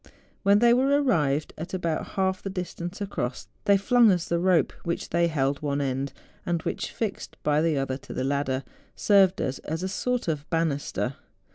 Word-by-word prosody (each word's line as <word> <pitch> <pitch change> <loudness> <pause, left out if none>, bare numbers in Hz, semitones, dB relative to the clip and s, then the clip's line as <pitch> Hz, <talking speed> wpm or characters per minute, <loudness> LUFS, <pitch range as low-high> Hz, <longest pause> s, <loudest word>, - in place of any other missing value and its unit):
When 200 0 +5
they 235 +2 +5
were 255 +2 +3
arrived 155 - +1
at 170 +4 -4
about 170 -4 -2
half 190 -1 +1
the 195 - -4
distance 180 0 -5
across, 130 -11 -3 0.2
they 200 -1 +5
flung 230 +2 +5
us 175 -2 0
the 170 - +1
rope 175 -5 +3
which 170 - -3
they 170 0 +2
held 140 -3 0
one 145 -1 -1
end, 135 0 -1 0.3
and 175 -1 0
which, - - -3
fixed 215 -4 -4
by 150 0 +3
the 160 -2 +1
other 135 -1 -1
to - - -13
the 130 - -1
ladder, 135 -1 0 0.3
served 195 -2 +4
us 130 - -2
as 160 +3 -4
a - - 0
sort 250 +5 -1
of 150 -3 -2
banister. 145 -5 -1
170 Hz, 185 wpm, -26 LUFS, 140-195 Hz, 0.3 s, When